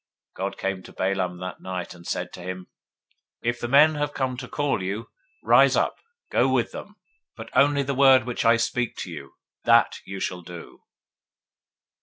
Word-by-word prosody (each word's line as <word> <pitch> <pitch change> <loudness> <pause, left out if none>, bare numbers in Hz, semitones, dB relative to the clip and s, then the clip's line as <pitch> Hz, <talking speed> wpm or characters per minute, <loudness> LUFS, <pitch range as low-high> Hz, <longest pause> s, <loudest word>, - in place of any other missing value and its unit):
022:020 - - -18
God 95 +1 -3
came 95 -1 -3
to - - -14
Balaam 95 -2 -2
at 90 - -6
night, 90 -2 -5
and 85 -1 -13
said - - -3
to 90 - -9
him, 90 0 -6 0.8
If 120 0 -1
the 120 - -3
men 150 +5 +6
are 145 0 0
come 130 -3 -2
to 125 0 -6
call 145 -8 -1
you, 100 +5 -4 0.3
rise - - +5
up, - - +1 0.3
go 130 +2 +3
with 125 -3 +1
them; 205 - -9 0.4
but 115 0 -10
only 140 +1 +4
the 140 +1 -2
word 135 -1 +6
which 125 -1 -3
I 115 0 +5
speak 120 0 -1
to - - -6
you, - - -9 0.3
that - - +4
shall 95 -2 -3
you - - -14
do. 85 0 -11
115 Hz, 185 wpm, -25 LUFS, 95-135 Hz, 0.8 s, men